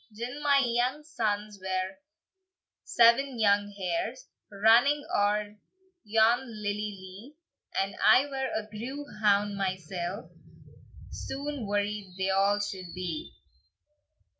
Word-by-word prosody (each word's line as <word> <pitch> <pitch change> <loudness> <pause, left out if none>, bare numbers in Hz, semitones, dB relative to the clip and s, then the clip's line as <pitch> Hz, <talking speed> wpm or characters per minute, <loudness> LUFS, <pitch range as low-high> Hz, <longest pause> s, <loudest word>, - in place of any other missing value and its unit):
"Gin 240 +6 -6
my 280 -2 +4
young 245 +5 0
sons 210 -8 -2
were 190 0 -2 0.8
seven 240 +2 +4
young 205 -2 +3
hares, 335 - -3 0.2
Running 235 +8 +4
oer 205 +1 +1 0.5
yon 225 +2 +4 0.2
lilly 205 0 0 0.2
lee, 190 +10 -12 0.4
And 195 +1 -1
I 265 - +6
were 265 -2 -3
a 220 - -2
grew 250 +7 -6 0.2
hound 205 -1 +3
mysell, 185 +1 -4 0.8
Soon 280 -4 -5
worried 205 -2 -2
they 190 0 0
a' 200 +2 +3
should 190 -4 -5
be." 175 -4 -4
210 Hz, 110 wpm, -29 LUFS, 195-250 Hz, 0.8 s, I